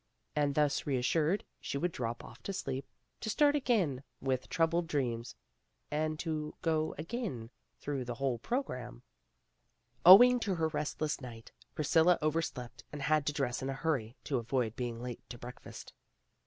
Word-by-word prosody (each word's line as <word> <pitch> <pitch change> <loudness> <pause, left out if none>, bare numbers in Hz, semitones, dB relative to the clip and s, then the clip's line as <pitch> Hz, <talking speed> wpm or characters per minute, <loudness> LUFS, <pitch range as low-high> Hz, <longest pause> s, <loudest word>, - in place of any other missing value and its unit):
And 145 -2 +1
thus 150 -1 +1
reassured, 150 +7 +1 0.2
she - - -3
would 175 +4 0
drop 120 -5 -4
off - - -12
to 195 - -4
sleep, 135 -6 -3 0.3
to 220 - -4
start 290 +5 +4
again 205 - +1 0.2
with 130 -1 -1
troubled 165 +1 +1
dreams, 120 -6 -2 0.6
and 155 +1 0
to 155 -2 -3
go 160 -1 +1
again 160 - -4 0.3
through 140 -3 -3
the 120 0 -4
whole 130 -2 -1
program. 125 - -3 1.0
Owing 245 +8 +10
to 200 -5 -1
her 160 -1 +1
restless 150 -1 -2
night, 115 -3 -9 0.2
Priscilla 160 +3 +4
over 155 +1 +1
slept 125 -6 -6
and 145 -2 -5
had 155 -1 +2
to 150 - +1
dress 130 -4 -1
in 135 - -2
a - - -1
hurry 135 -6 -1
to 135 -4 0
avoid 115 -1 -1
being 120 -2 -4
late 125 -2 -5
to 120 - -7
breakfast. 125 +1 -10
150 Hz, 160 wpm, -33 LUFS, 125-165 Hz, 1.0 s, Owing